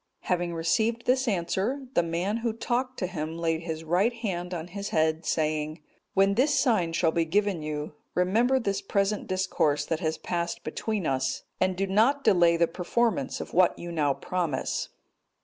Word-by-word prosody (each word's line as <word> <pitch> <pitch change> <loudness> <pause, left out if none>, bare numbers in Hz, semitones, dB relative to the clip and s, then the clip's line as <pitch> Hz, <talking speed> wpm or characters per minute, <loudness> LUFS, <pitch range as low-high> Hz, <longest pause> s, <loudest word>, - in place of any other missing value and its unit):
Having 175 -2 -1
received 225 +8 +1
this 260 +1 +2
answer, 210 +7 -1
the - - +4
man 175 +6 -1
who 230 -1 -1
talked 250 +3 -2
to - - -1
him 165 -3 -4
laid 165 -1 0
his 160 -1 -5
right 180 +8 +2
hand 190 -7 -4
on 175 -1 -5
his 200 +2 -5
head 160 +1 +1
saying, 155 0 -1 0.4
"When 195 0 +4
this 270 +5 +3
sign 210 -11 +2
shall 165 -1 +2
be 165 +1 +1
given 195 +1 +1
you, 150 0 -4 0.2
remember 225 +9 +3
this 200 -4 -1
present 200 +1 0
discourse 185 -6 +1
that 160 - -1
has 160 -3 -1
passed 170 -1 -3
between 205 +4 -3
us, 130 -1 -1 0.2
and 185 0 +2
do 195 - +1
not 225 +9 +3
delay 175 -5 +5
the 170 - +4
performance 185 - 0
of - - -7
what 180 +1 +4
you 175 - -6
now 145 -4 +1
promise." 170 -7 -2
180 Hz, 175 wpm, -27 LUFS, 165-215 Hz, 0.4 s, delay